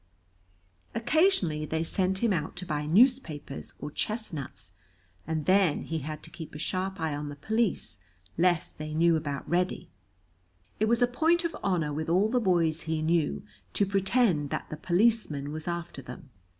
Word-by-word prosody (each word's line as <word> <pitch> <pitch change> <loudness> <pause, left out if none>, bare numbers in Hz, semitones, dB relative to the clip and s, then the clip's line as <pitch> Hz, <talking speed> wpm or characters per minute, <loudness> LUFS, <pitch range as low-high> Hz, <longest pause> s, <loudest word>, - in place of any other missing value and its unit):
Occasionally 230 - +2
they 160 +1 -1
sent 190 +4 0
him 225 -4 +3
out 160 -4 -2
to 180 +1 -6
buy 150 -2 -2
newspapers 180 - +2
or 150 - -5
chestnuts, 160 - -3 0.6
and 160 -2 -2
then 185 -3 +3
he 160 0 -3
had 155 +1 -6
to - - -9
keep 160 -3 -9
a - - -4
sharp 185 +4 -2
eye 160 -2 -1
on 145 0 -4
the 145 - -7
police 220 - -1 0.4
lest 175 -2 +1
they 155 0 -5
knew 170 +1 +4
about 145 -3 -3
Reddy. 180 +1 -1 0.9
It 215 - +2
was 235 +2 +3
a - - +5
point 325 +7 +2
of 335 - -2
honor 165 -6 0
with 155 +2 -3
all 190 +5 +3
the 250 +2 +2
boys 170 -6 +2
he 160 -1 0
knew 155 - +1 0.3
to 200 - +3
pretend 195 - +2
that - - -4
the - - -3
policeman 175 -5 +1
was 155 +2 -6
after 170 -4 -4
them. 130 +1 -11
170 Hz, 170 wpm, -28 LUFS, 155-200 Hz, 0.9 s, a